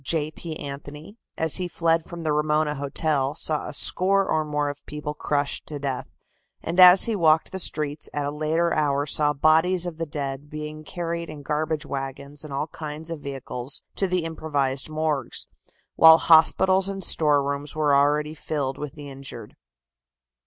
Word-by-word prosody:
J. 155 +1 +1
P. 160 0 -7
Anthony, 145 +7 -9 0.2
as 160 -1 +1
he 180 -1 -2
fled 165 -1 0
from 170 -1 -8
the 155 -2 0
Ramona 150 0 +1
Hotel, 140 0 -1
saw 155 -2 -2
a - - -5
score 195 +6 +3
or 155 0 +1
more 150 -1 -2
of 145 0 -6
people 150 0 -5
crushed 145 -1 -2
to 150 - -6
death, 135 -2 -4 0.6
and 170 +3 -3
as 180 +1 +9
he 230 - +1
walked 160 -4 +3
the 190 - -4
streets 150 -4 -2
at 145 -1 -3
a 145 - -2
later 155 +3 0
hour 145 -2 +1
saw 150 0 +3
bodies 160 +5 +3
of 170 -2 -6
the 165 - -3
dead 140 -1 -5
being 155 0 -7
carried 170 +1 -4
in 150 -2 -9
garbage 155 +1 -2
wagons 140 +1 -6
and 155 - -8
all 140 +2 -2
kinds 155 +2 -7
of 165 - -5
vehicles 135 -2 -5
to 195 - +2
the 180 -1 0
improvised 145 -4 -2
morgues, 155 -2 -2 0.5
while 160 0 +9
hospitals 185 +4 +5
and 195 -1 -4
storerooms 145 -2 +2
were 150 -2 +2
already 150 +2 +2
filled 145 -4 -3
with 150 -2 -6
the 145 -2 -10
injured. 135 -1 -9
150 Hz, 175 wpm, -24 LUFS, 145-160 Hz, 0.6 s, as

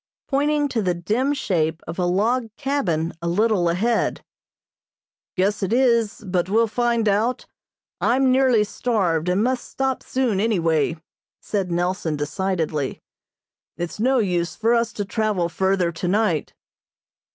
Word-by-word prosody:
pointing 290 +1 +1
to 245 -5 -1
the 180 -3 0
dim 215 +11 0
shape 165 - 0
of 170 - -6
a 180 - +2
log 225 +7 +1
cabin 185 - -1
a 170 - -3
little 195 -1 +2
ahead. 220 +7 0 1.1
"Guess 200 +3 +1
it 195 - -1
is, 235 -3 +2
but 180 -1 -1
we'll 225 +3 +4
find 235 0 0
out. 215 +5 +1 0.5
I'm 260 +2 +3
nearly 255 -4 +4
starved, 185 -7 0
and 185 +4 +2
must 255 +1 0
stop 265 -1 -1
soon, 250 -7 0
any 220 0 +1
way," 165 -1 +1 0.4
said 195 -4 -2
Nelson 175 -2 -1
decidedly. 155 -1 -2 0.8
"It's 175 +3 -5
no 260 +4 +3
use 180 -6 0
for 230 +2 +2
us 235 -1 +1
to 205 - -3
travel 210 -4 0
further 190 0 +1
tonight." 180 -1 0
205 Hz, 140 wpm, -22 LUFS, 175-235 Hz, 1.1 s, we'll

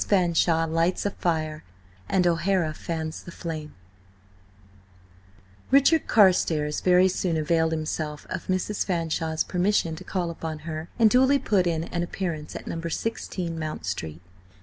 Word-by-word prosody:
FANSHAWE 170 -3 +3
LIGHTS 165 +4 0
A 205 - +1
FIRE 155 -4 -2 0.5
AND 185 -2 +2
O'HARA 170 -1 +1
FANS 160 0 -4
THE 170 - -10
FLAME 160 -3 -6 1.9
RICHARD 280 +4 +4
CARSTARES 165 -7 +3
very 180 0 +5
soon 180 -2 -1
availed 160 +1 +1
himself 155 -1 -3
of - - -4
Mrs. 185 +2 0
Fanshawe's 160 -3 -1
permission 180 -3 +1
to 175 - -9
call 180 -2 -2
upon 160 -2 -6
her, 160 0 -5
and 230 -2 +6
duly 265 +3 +5
put 195 -9 +1
in 165 -2 0
an 170 +1 -3
appearance 170 -3 -4
at - - -7
No. 165 - -4
16 170 -1 -3
Mount 155 - -4
Street. 80 -3 -4
170 Hz, 140 wpm, -26 LUFS, 155-185 Hz, 1.9 s, and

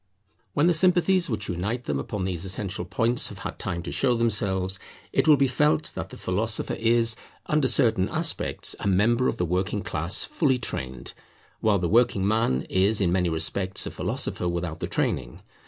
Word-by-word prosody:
When 145 - +3
the 175 - +4
sympathies 180 +1 +3
which 105 -4 -3
unite 100 +8 -3
them 70 - -2
upon 95 +7 -4
these 90 -2 -3
essential 95 -1 -3
points 115 +6 +2
have - - -9
had - - -7
time 85 -2 -3
to 85 - -5
show 125 -3 +2
themselves, 100 -5 0 0.3
it - - +2
will 150 -2 +7
be 135 - +3
felt 150 +4 +1
that - - -5
the - - -11
philosopher 110 +5 -1
is, 115 0 +2 0.3
under 150 -3 +1
certain 110 -7 +3
aspects, 165 +1 -1
a - - -3
member 115 +6 +3
of - - -1
the 90 - 0
working 95 +4 -1
class 80 +4 -1
fully 135 -6 +1
trained; 65 - -5 0.5
while 105 -2 +2
the 90 -2 -1
working 110 -2 +3
man 105 - +1
is 100 +3 +1
in 90 -4 +1
many 90 -1 +1
respects 95 +4 0
a - - -5
philosopher 90 - -2
without 85 -2 -3
the - - -3
training. - - -2
100 Hz, 185 wpm, -25 LUFS, 90-120 Hz, 0.5 s, will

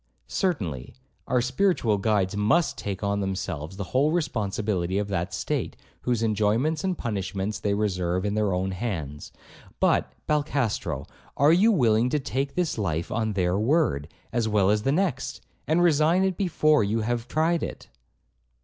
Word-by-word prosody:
'Certainly; 90 - -2 0.3
our 125 -1 +2
spiritual 125 - +1
guides 100 -2 +1
must 110 +11 +2
take 100 -1 -5
on 100 0 0
themselves 95 -3 -4
the 100 - -3
whole 140 +4 +3
responsibility 105 - -1
of 105 0 -1
that 90 -2 -2
state, - - -2 0.3
whose 120 -2 0
enjoyments 110 - +1
and 185 -2 -1
punishments 100 -2 -3
they 100 0 0
reserve 90 -3 -1
in 100 - 0
their 105 -2 +1
own 95 +1 -1
hands; 85 - -4 0.5
but, - - +2
Balcastro, 140 - -1 0.3
are 145 +3 +5
you 205 +7 +5
willing 120 - +3
to 150 - +1
take 135 +1 -3
this 175 -9 -1
life 85 -5 -2
on 110 -1 -1
their 90 0 +1
word, 115 - +1 0.3
as 115 -2 +1
well 105 -2 +3
as 105 0 +2
the 135 - +1
next, 150 -5 -1 0.3
and 165 +3 +3
resign 165 +2 +4
it 190 -1 +1
before 155 - +3
you 110 +3 0
have 120 +1 -2
tried 160 +5 +1
it?' - - -6
110 Hz, 160 wpm, -26 LUFS, 95-145 Hz, 0.5 s, are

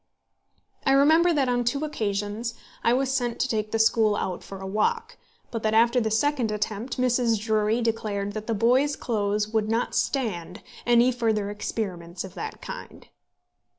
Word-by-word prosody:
I 270 - +3
remember 315 +5 +5
that 285 -5 +2
on 245 -1 +1
two 280 +5 0
occasions 215 -3 -3 0.3
I 235 - +4
was 265 +2 +1
sent 245 -3 -1
to - - +1
take 215 -3 -1
the 225 - 0
school 220 -1 +3
out 185 -3 -3
for 195 - -9
a 190 - -7
walk; 460 - -1 0.4
but 230 -2 -3
that 220 0 +1
after 235 +2 +4
the 220 - 0
second 250 +1 +1
attempt 215 +3 -3
Mrs. 245 -3 +2
Drury 215 +1 +1
declared 205 -3 -2
that 215 0 -6
the 225 - 0
boys' 255 +7 +3
clothes 210 -2 -1
would 215 -1 0
not 230 +2 0
stand 185 - -2 0.2
any 240 +1 +5
further 220 -4 0
experiments 180 -5 -4
of 190 - -9
that 440 0 -7
kind. - - -9
225 Hz, 170 wpm, -26 LUFS, 210-250 Hz, 0.4 s, remember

